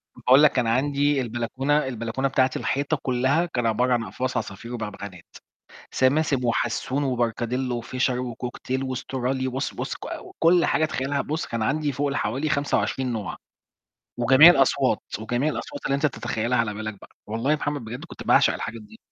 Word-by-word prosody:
باقول 130 +4 +5
لك 145 -3 +5
أنا 120 -2 +1
عَندي 140 +1 +1
البلكونة 130 +5 -1
البلكونة 120 +2 -2
بتاعتي 130 -1 +1
الحيطة 145 +3 -1
كلها 135 +6 +1
كان 120 -8 -2
عبارة 125 +3 +2
عن 120 -2 +1
أقفاص 130 +1 -3
عصافير 115 +2 -5
وبغبغانات: 100 -5 -7 0.7
سماسم، 135 -1 +2
وحسون، 120 +4 0
وبركاديلو، 120 0 -1
وFischer، 130 +1 -1 0.2
وCockatiel، 125 +2 -4
واسترالي. 130 0 -2
بُص، 130 +2 -3
بُص - - -4
ك - - -12 0.4
كُلّ 170 +1 +5
حاجة 155 - +2
تخيّلها، 140 -1 -1
بُص 155 +3 -3
كان 115 - -4
عندي 145 +6 0
فوق 140 +2 -1
ال 140 - -2
حوالي 135 +8 -1
25 140 -3 0
نوع. 105 -4 -4 0.8
وجميع 130 +7 +8
الأصوات، 135 -5 +3 0.2
وجميع 120 +7 0
الأصوات 145 -1 -6
اللي 140 - +1
أنت 140 - 0
تتخيّلها 120 -3 -1
على 110 -3 0
بالك 110 -1 -6
بقى. - - -14 0.2
والله 115 +6 -1
يا - - +4
محمد 145 -2 -3
بجد 120 +3 -7
كنت - - -10
باعشق - - +4
الحاجات 110 0 -5
دي. 105 - -15
130 Hz, 165 wpm, -24 LUFS, 115-140 Hz, 0.8 s, وجميع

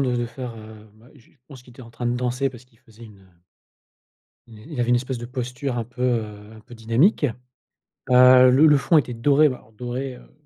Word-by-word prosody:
de 125 -2 0
de 120 0 -2
faire, 120 0 -8
heu 110 0 -13
bah, 110 +3 -21
je 120 - -23 0.2
pense 130 -4 -13
qu'il 125 - -17
était 125 - -14
en 115 - -14
train 120 +1 -6
de 120 - 0
danser 125 +2 -1
parce 125 -1 -14
qu'il 115 -3 -31
faisait 115 -1 -20
une, 105 -3 -16
heu 90 -3 -26 1.1
une 110 -2 -15
il 145 -6 -7
avait 120 0 0
une 125 - +4
espèce 125 +1 -3
de 120 - -7
posture 125 +1 -5
un 115 - -2
peu, 120 +2 -11
heu, 110 -4 -3
un 110 - -14
peu 120 +2 -16
dynamique. 115 - +1 0.9
Heu, 125 0 +7
le 135 +5 +5
le 150 -2 +5
fond 135 +4 +2
était 125 -3 -2
doré, 145 +6 +3
alors 125 -5 -5
doré, 125 +3 -6
heu, - - -18
125 Hz, 230 wpm, -22 LUFS, 115-130 Hz, 1.1 s, Heu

